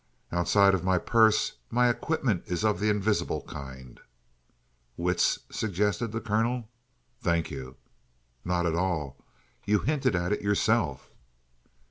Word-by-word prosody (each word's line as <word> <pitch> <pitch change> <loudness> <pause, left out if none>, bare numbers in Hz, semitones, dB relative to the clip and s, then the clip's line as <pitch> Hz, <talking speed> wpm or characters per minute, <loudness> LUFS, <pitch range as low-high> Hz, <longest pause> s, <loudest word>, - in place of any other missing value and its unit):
"Outside 100 +3 +4
of 90 -2 0
my 95 0 +2
purse, 110 - +3
my 125 +1 +3
equipment 120 - 0
is 90 +4 -1
of 105 -1 +2
the 105 +1 +1
invisible 105 0 0
kind." 65 -2 -10 1.0
"Wits," 90 +1 +2
suggested 105 +1 -1
the 115 - -2
colonel. 115 +2 -1 0.5
"Thank 85 -1 0
you." 65 -1 -7 0.7
"Not 90 0 0
at 85 - +1
all. 80 -6 -2 0.4
You 105 +1 +2
hinted 130 -2 0
at 90 +2 -1
it 105 - 0
yourself." 100 - 0
100 Hz, 125 wpm, -28 LUFS, 85-110 Hz, 1.0 s, Outside